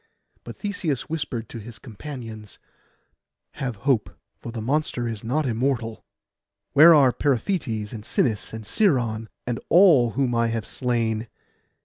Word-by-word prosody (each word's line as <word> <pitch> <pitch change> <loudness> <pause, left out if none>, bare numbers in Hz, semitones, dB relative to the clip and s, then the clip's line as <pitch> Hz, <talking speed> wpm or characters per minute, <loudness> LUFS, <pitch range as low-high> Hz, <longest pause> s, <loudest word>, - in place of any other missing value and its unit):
But - - -9
Theseus 175 - -3
whispered 130 -8 -3
to 115 - -7
his 110 0 -10
companions, 115 -3 -9 0.9
'Have 125 -4 -4
hope, 130 -7 +2 0.3
for 115 - -8
the 115 - -5
monster 125 0 -1
is 110 -3 -5
not 140 +7 0
immortal. 120 -2 -1 0.7
Where 160 +3 +9
are 135 -4 +6
Periphetes, 120 - -1
and 110 -2 -7
Sinis, 110 -1 0
and 110 0 -7
Sciron, 120 - +1 0.2
and 120 -2 -2
all 160 - +6
whom 130 -3 +1
I 115 0 +2
have 115 -2 -2
slain? 115 -3 -1
120 Hz, 135 wpm, -24 LUFS, 110-140 Hz, 0.9 s, Where